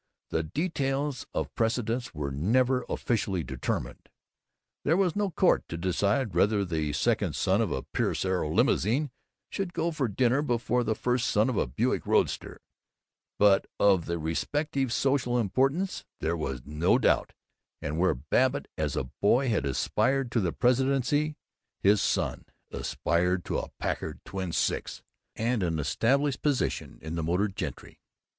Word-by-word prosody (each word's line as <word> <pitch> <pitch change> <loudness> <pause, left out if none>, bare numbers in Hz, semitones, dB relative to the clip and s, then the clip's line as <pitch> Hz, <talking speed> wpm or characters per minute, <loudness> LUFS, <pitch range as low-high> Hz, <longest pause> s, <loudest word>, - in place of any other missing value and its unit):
The 80 - +1
details 140 - -2
of - - -3
precedence 115 +1 -1
were 75 -3 -4
never 125 - +2
officially 100 -7 -1
determined. 65 -4 -4 0.7
There 160 +4 +3
was 185 -4 +2
no 205 -1 +1
court 180 +1 +2
to 85 - -4
decide 100 +6 0
whether 105 -1 +3
the 80 -4 -1
second 70 - +1
son 95 +4 +2
of 105 -8 0
a 65 - -2
Pierce - - -1
Arrow 95 -5 0
limousine 125 - +2 0.4
should 190 -3 -3
go 165 +1 +1
in - - -5
to 140 -5 0
dinner 125 +5 +2
before 120 -2 0
the 110 -1 0
first 125 +2 0
son 110 +5 +3
of 115 - -3
a - - +1
Buick - - -1
roadster, - - 0 0.7
but 100 -1 +4
of 95 -4 +4
their 85 0 -1
respective 135 - -1
social 130 -1 +1
importance 135 - 0 0.2
there 85 - 0
was 65 -6 -4
no 75 +4 +2
doubt; - - +2 0.5
and 75 +3 -3
where 95 -5 +3
Babbitt 130 - +1
as 75 -3 -1
a - - 0 0.2
boy 125 +6 +3
had 105 -10 +1
aspired 130 - 0
to 115 - +2
the 90 -5 0
presidency, 135 - +1 0.4
his 100 +1 +4
son - - -1 0.3
Ted - - -5
aspired 90 +3 0
to - - -1
a - - -6
Packard - - -3
twin 95 -2 -4
six - - -1 0.3
and 115 0 0
an 85 -3 0
established 130 - +1
position 145 -3 -1
in 80 +1 -5
the 85 - -1
motored 90 +5 0
gentry. - - -6
115 Hz, 155 wpm, -28 LUFS, 85-135 Hz, 0.7 s, but